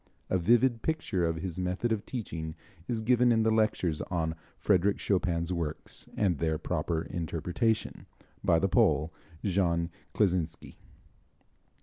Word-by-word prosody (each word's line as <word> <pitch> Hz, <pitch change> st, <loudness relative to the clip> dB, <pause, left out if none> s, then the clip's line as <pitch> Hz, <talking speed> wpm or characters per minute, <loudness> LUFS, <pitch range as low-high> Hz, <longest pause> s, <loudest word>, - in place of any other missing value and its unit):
A 95 Hz, -, +3 dB
vivid 120 Hz, +5 st, +3 dB
picture 105 Hz, -, 0 dB
of 80 Hz, -, 0 dB
his 85 Hz, +1 st, -4 dB
method 90 Hz, +6 st, -1 dB
of 110 Hz, -1 st, -1 dB
teaching 80 Hz, -10 st, -5 dB, 0.3 s
is 115 Hz, -2 st, -2 dB
given 125 Hz, +1 st, +4 dB
in 115 Hz, -1 st, +3 dB
the 110 Hz, -, +3 dB
lectures 110 Hz, -7 st, +1 dB
on 80 Hz, -3 st, 0 dB, 0.3 s
"Frédéric 100 Hz, 0 st, +3 dB
Chopin's 90 Hz, -3 st, 0 dB
Works 80 Hz, -3 st, -4 dB
and 95 Hz, -7 st, +2 dB
Their 80 Hz, -1 st, +1 dB
Proper 80 Hz, 0 st, -1 dB
Interpretation," 90 Hz, +7 st, -2 dB, 0.4 s
by 85 Hz, -, +4 dB
the 95 Hz, -, +2 dB
Pole, 80 Hz, -3 st, +3 dB, 0.3 s
Jean 85 Hz, -4 st, +1 dB, 0.2 s
Kleczynski. 90 Hz, -5 st, 0 dB
90 Hz, 130 wpm, -30 LUFS, 85-110 Hz, 0.4 s, given